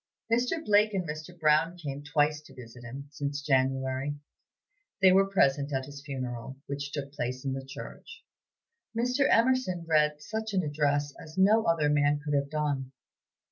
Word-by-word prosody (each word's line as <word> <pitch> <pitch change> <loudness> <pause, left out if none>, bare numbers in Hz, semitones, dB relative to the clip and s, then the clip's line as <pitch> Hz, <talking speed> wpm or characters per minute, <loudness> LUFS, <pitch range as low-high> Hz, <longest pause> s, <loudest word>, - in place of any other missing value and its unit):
Mr. 250 +7 +1
Blake 210 0 +4
and 180 -3 -1
Mr. 155 +3 -7
Brown 155 +3 +3
came 145 -4 -5
twice 150 +1 +1
to 150 - -17
visit 120 -1 -11
him, 135 +4 -8
since 145 -1 -4
January. 135 0 0 0.8
They 190 -1 +7
were 195 +1 +4
present 140 -6 +2
at 130 -1 -1
his 140 0 -10
funeral, 130 -2 -5
which 140 0 -5
took 140 -1 -5
place 130 -1 -4
in 135 - -1
the 135 0 -4
church. 290 - -10 0.7
Mr. 250 +4 +2
Emerson 230 -8 +2
read 150 -2 +3
such 220 +6 -4
an 185 - +2
address 145 -1 0
as 155 +2 -12
no 215 +4 +5
other 165 -3 +2
man 145 0 +3
could 145 0 -4
have 140 0 +1
done. 145 -3 -2
150 Hz, 165 wpm, -29 LUFS, 140-180 Hz, 0.8 s, They